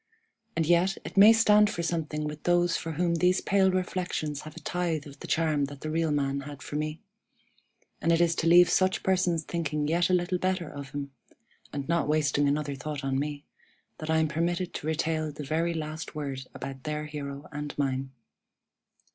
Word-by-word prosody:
And 165 Hz, -, +1 dB
yet, 175 Hz, +4 st, +3 dB
it -, -, -7 dB
may 200 Hz, +3 st, +9 dB
stand 210 Hz, -2 st, +5 dB
for 170 Hz, -5 st, -3 dB
something 155 Hz, -3 st, -2 dB
with 150 Hz, 0 st, -5 dB
those 175 Hz, 0 st, +2 dB
for 160 Hz, -, -3 dB
whom 170 Hz, +2 st, +1 dB
these 180 Hz, +2 st, +3 dB
pale 195 Hz, -1 st, +3 dB
reflections 180 Hz, -5 st, -2 dB
have 155 Hz, 0 st, -10 dB
a -, -, -7 dB
tithe 170 Hz, -4 st, -2 dB
of 140 Hz, -1 st, -12 dB
the -, -, -8 dB
charm 155 Hz, -3 st, +1 dB
that 140 Hz, 0 st, -10 dB
the 155 Hz, -, -4 dB
real 165 Hz, 0 st, +1 dB
man 140 Hz, -2 st, 0 dB
had 140 Hz, 0 st, -8 dB
for -, -, -7 dB
me; 155 Hz, +3 st, -3 dB, 1.0 s
and 165 Hz, -, +2 dB
it 165 Hz, -, +4 dB
is 170 Hz, -1 st, +4 dB
to 165 Hz, -, +1 dB
leave 175 Hz, +1 st, +8 dB
such 185 Hz, 0 st, +2 dB
persons 180 Hz, -3 st, +1 dB
thinking 155 Hz, -3 st, -2 dB
yet 170 Hz, +3 st, +2 dB
a -, -, +2 dB
little 180 Hz, +1 st, 0 dB
better 185 Hz, -2 st, 0 dB
of 140 Hz, -2 st, -8 dB
him 140 Hz, 0 st, -5 dB, 0.6 s
(and 140 Hz, -1 st, -4 dB
not 170 Hz, -1 st, +1 dB
wasting 150 Hz, -1 st, +2 dB
another 145 Hz, 0 st, 0 dB
thought 140 Hz, +2 st, -5 dB
on 135 Hz, 0 st, 0 dB
me) 145 Hz, 0 st, -4 dB, 0.5 s
that 155 Hz, -, -6 dB
I 160 Hz, -, +3 dB
am 160 Hz, 0 st, +3 dB
permitted 170 Hz, +3 st, -1 dB
to 150 Hz, -, -5 dB
retail 155 Hz, 0 st, 0 dB
the 150 Hz, 0 st, -7 dB
very 165 Hz, +3 st, 0 dB
last 155 Hz, -1 st, -5 dB
word 135 Hz, -3 st, -4 dB
about 135 Hz, 0 st, -6 dB
their 150 Hz, +1 st, -3 dB
hero 145 Hz, -1 st, -6 dB
and 150 Hz, -1 st, -6 dB
mine. 135 Hz, -1 st, -1 dB
155 Hz, 195 wpm, -28 LUFS, 145-175 Hz, 1.0 s, may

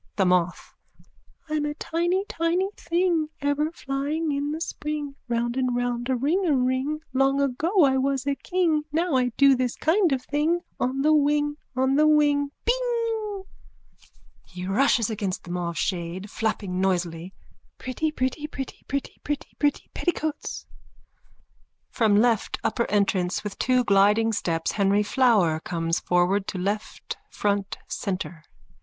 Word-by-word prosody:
THE 195 Hz, -, +2 dB
MOTH: 180 Hz, -1 st, +1 dB, 0.7 s
I'm 305 Hz, -1 st, -1 dB
a 295 Hz, 0 st, -2 dB
tiny 345 Hz, +5 st, 0 dB
tiny 340 Hz, +4 st, 0 dB
thing 340 Hz, -3 st, 0 dB
Ever 285 Hz, +2 st, 0 dB
flying 295 Hz, +2 st, -2 dB
in 285 Hz, +1 st, -1 dB
the 310 Hz, +2 st, -3 dB
spring 300 Hz, -3 st, -4 dB
Round 235 Hz, 0 st, -1 dB
and 255 Hz, -2 st, 0 dB
round 245 Hz, 0 st, -1 dB
a 260 Hz, -, +2 dB
ringaring. 280 Hz, -1 st, +1 dB
Long 270 Hz, +1 st, +3 dB
ago 310 Hz, +8 st, +2 dB
I 265 Hz, -2 st, +4 dB
was 270 Hz, 0 st, 0 dB
a 280 Hz, -, +1 dB
king 325 Hz, +2 st, +1 dB
Now 330 Hz, +2 st, 0 dB
I 255 Hz, -1 st, +3 dB
do 275 Hz, -1 st, +6 dB
this 250 Hz, -1 st, -1 dB
kind 345 Hz, +1 st, +2 dB
of 260 Hz, -2 st, 0 dB
thing 310 Hz, +5 st, 0 dB, 0.2 s
On 265 Hz, +2 st, 0 dB
the 310 Hz, +1 st, +5 dB
wing, 295 Hz, 0 st, +2 dB, 0.2 s
on 265 Hz, +1 st, +2 dB
the 305 Hz, +1 st, +5 dB
wing! 290 Hz, -2 st, +3 dB, 0.2 s
Bing! 460 Hz, -4 st, -1 dB, 1.0 s
(He 180 Hz, 0 st, -8 dB
rushes 230 Hz, +2 st, +2 dB
against 200 Hz, -4 st, -3 dB
the 175 Hz, -, -8 dB
mauve 175 Hz, -1 st, -3 dB
shade, 185 Hz, +2 st, -3 dB
flapping 200 Hz, -4 st, -2 dB
noisily.) 180 Hz, -1 st, -1 dB, 0.4 s
Pretty 285 Hz, +5 st, -2 dB
pretty 290 Hz, +1 st, -2 dB
pretty 270 Hz, -3 st, -7 dB
pretty 280 Hz, 0 st, -3 dB
pretty 295 Hz, -1 st, -4 dB
pretty 290 Hz, -1 st, +1 dB
petticoats. 315 Hz, -4 st, -3 dB, 1.3 s
_(From 215 Hz, -3 st, +3 dB
left 230 Hz, -1 st, +2 dB
upper 235 Hz, +1 st, 0 dB
entrance 190 Hz, -3 st, +1 dB
with 210 Hz, -2 st, -6 dB
two 255 Hz, 0 st, +3 dB
gliding 210 Hz, +2 st, +4 dB
steps 165 Hz, -5 st, -1 dB
Henry 200 Hz, 0 st, +2 dB
Flower 210 Hz, -, +3 dB
comes 165 Hz, 0 st, -1 dB
forward 180 Hz, +3 st, +1 dB
to -, -, -4 dB
left 205 Hz, +4 st, -3 dB
front 200 Hz, -1 st, -1 dB
centre. 185 Hz, -4 st, -4 dB
265 Hz, 140 wpm, -25 LUFS, 205-305 Hz, 1.3 s, do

